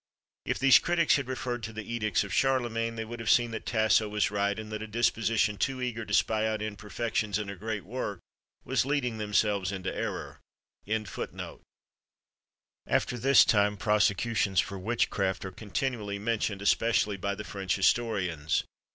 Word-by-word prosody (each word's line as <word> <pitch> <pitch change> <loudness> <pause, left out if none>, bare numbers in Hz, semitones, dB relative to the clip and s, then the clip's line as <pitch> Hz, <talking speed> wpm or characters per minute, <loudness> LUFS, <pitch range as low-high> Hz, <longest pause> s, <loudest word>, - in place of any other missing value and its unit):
If - - 0
these 135 -1 +7
critics 170 -3 +3
had 140 -3 -4
referred 125 -2 -3
to 110 +1 -5
the 110 -1 -6
edicts 110 -3 +1
of 100 -2 -6
Charlemagne, 120 -4 +1
they 110 0 -4
would 120 +1 -7
have 115 - -3
seen 120 -1 +4
that 110 - -6
Tasso 110 -1 +3
was 105 0 0
right, 100 0 0
and 110 0 -7
that 110 0 -4
a 110 - -5
disposition 115 -1 +1
too 135 -2 0
eager 120 -3 -3
to 105 - -6
spy 110 0 +2
out 110 -1 -1
imperfections 105 0 -2
in 105 -2 -4
a - - -7
great 110 0 -4
work 105 -3 -4 0.5
was - - +1
leading 125 -5 -1
themselves 105 -2 +1
into 95 -1 -4
error. - - -4 0.5
After 110 -2 -4 1.6
this 130 0 +6
time, 105 -1 +3
prosecutions 105 -1 +2
for 100 0 -1
witchcraft 95 -3 -1
are 95 - -5
continually 105 0 -3
mentioned, 105 -2 -1
especially 105 -1 +2
by 100 +1 -2
the 105 - -6
French 95 -4 -2
historians. 90 -10 +1
110 Hz, 160 wpm, -29 LUFS, 100-115 Hz, 1.6 s, these